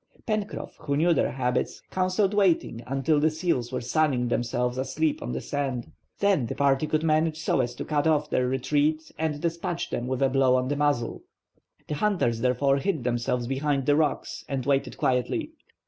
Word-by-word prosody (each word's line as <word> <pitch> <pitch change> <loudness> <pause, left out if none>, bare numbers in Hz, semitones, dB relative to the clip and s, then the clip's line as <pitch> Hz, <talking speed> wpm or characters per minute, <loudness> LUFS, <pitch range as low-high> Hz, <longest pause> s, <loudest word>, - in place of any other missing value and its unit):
Pencroff, 215 -2 -3
who 140 -2 -1
knew 170 +3 +4
their 150 - +1
habits, 125 -2 -1
counselled 185 +2 +1
waiting 180 - +2
until 135 +3 +1
the 155 +2 +3
seals 155 -7 -1
were - - -2
sunning 125 -1 +1
themselves 125 +1 -1
asleep 140 +4 -1
on - - -4
the 65 - -2
sand. 135 -4 -3 0.3
Then 195 -12 +2
the - - -4
party 140 +1 +2
could 155 +1 0
manage 155 0 +2
so 160 - +1
as 120 -1 -3
to - - -5
cut 150 0 +1
off 150 -1 +2
their 125 -3 +1
retreat 145 +4 0
and 155 -2 -1
despatch 170 +1 -3
them 120 - -2
with 130 +1 -1
a 135 - +4
blow 130 -1 +3
on 130 0 0
the 145 - 0
muzzle. 145 -5 0 0.7
The - - -3
hunters 150 - +1
therefore 130 +2 +2
hid 155 -2 -1
themselves 120 0 -1
behind 135 +1 0
the 145 - +4
rocks 150 -2 -1
and 135 -3 -2
waited 140 0 0
quietly. 125 -2 0
140 Hz, 185 wpm, -26 LUFS, 125-155 Hz, 0.7 s, knew